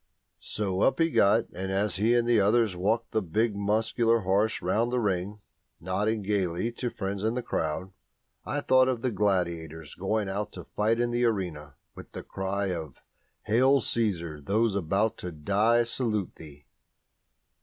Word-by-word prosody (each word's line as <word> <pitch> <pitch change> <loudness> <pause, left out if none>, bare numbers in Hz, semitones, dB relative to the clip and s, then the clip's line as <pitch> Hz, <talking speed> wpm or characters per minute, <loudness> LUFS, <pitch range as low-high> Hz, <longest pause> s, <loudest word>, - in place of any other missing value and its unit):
So 100 -2 -2
up - - +3
he 165 0 +3
got; 110 0 +4
and 95 +2 -4
as 100 -1 0
he 110 +4 +3
and 120 -1 +2
the 120 -2 +4
others 105 -1 +2
walked 110 +6 0
the 110 - +1
big 105 +5 0
muscular 110 +3 +1
horses 100 +2 +1
round 110 +7 +1
the 125 - +1
ring, 100 -1 -2 0.4
nodding 105 +5 -1
gaily 95 +1 -1
to 120 +1 -3
friends 100 -2 -4
in 110 +2 0
the 125 - -2
crowd, 80 +2 -2 0.5
I 145 - -2
thought 130 -2 +4
of 125 -3 -1
the 130 - +1
gladiators 85 -6 -1
going 100 +2 -1
out 100 +1 -3
to - - -8
fight 110 +2 0
in 120 0 +1
the 120 +1 +1
arena 85 - -2 0.2
with - - -12
the - - -7
cry 95 0 -2
of 80 -6 -6 0.5
"Hail, 130 +6 +4
Caesar, 85 - -1
those 110 +7 +1
about 100 +4 0
to 90 - -5
die 105 +9 +2
salute 115 -4 -2
thee!" 75 -3 -13
105 Hz, 165 wpm, -27 LUFS, 95-115 Hz, 0.5 s, got